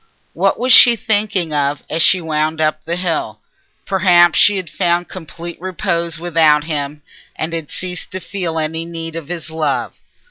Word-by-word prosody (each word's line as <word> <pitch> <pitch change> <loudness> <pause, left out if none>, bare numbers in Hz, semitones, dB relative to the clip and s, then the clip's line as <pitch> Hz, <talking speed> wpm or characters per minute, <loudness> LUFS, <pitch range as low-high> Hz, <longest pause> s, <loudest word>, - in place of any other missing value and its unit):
What - - +1
was 255 +1 +3
she 240 -1 +8
thinking 205 -7 -1
of 145 0 -1
as 160 - -1
she 185 - +5
wound 155 0 -1
up 155 0 0
the 170 +2 -3
hill? 165 -12 -3 0.5
Perhaps 175 -3 +4
she 205 -1 +5
had 185 -2 -4
found 175 +1 0
complete 170 -1 -9
repose 170 -2 -2
without 160 -3 +3
him, 150 -1 -4 0.3
and 160 +1 -4
had 165 -3 -4
ceased 180 -1 -6
to 190 - -3
feel 175 -4 -4
any 160 +1 -2
need 165 -1 -6
of 165 -3 -6
his 170 -2 -6
love. 160 -1 -2
165 Hz, 170 wpm, -17 LUFS, 155-180 Hz, 0.5 s, she